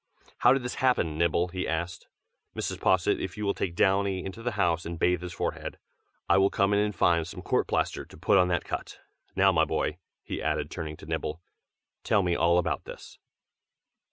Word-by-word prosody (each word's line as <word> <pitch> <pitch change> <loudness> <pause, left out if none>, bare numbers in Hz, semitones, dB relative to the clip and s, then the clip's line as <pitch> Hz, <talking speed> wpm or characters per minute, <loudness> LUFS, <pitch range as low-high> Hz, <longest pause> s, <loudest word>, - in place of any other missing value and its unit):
"How 120 - +6
did 135 -1 +2
this 125 +3 -4
happen, 125 -12 +2
Nibble?" 85 +2 +1
he 90 +1 -3
asked. 85 +2 -3 0.5
"Mrs. - - -3
Posset, 95 -2 +3
if 95 0 -5
you 105 - -3
will 100 - +2
take 85 -2 -3
Downy 95 0 +2
into 95 +4 -7
the 120 0 -2
house 85 -5 +1
and 85 0 -5
bathe 90 +1 +2
his 90 0 -6
forehead, - - -4 0.5
I - - +5
will 95 +1 +4
come 100 +1 +1
in 100 - +3
and 105 -1 0
find 85 -1 +2
some - - -8
court - - +1
plaster - - -1
to - - -15
put 95 - +3
on 90 - +4
that 90 -1 0
cut. - - -5 0.4
Now 95 0 +5
my 80 -3 +3
boy," 80 +1 -1 0.2
he - - -5
added, - - -1
turning 75 -2 -5
to - - -12
Nibble, 75 +2 -3 0.6
"tell 105 -3 +2
me 90 -1 +1
all 85 +1 +3
about 90 - -1
this!" - - -11
90 Hz, 205 wpm, -28 LUFS, 85-100 Hz, 0.6 s, How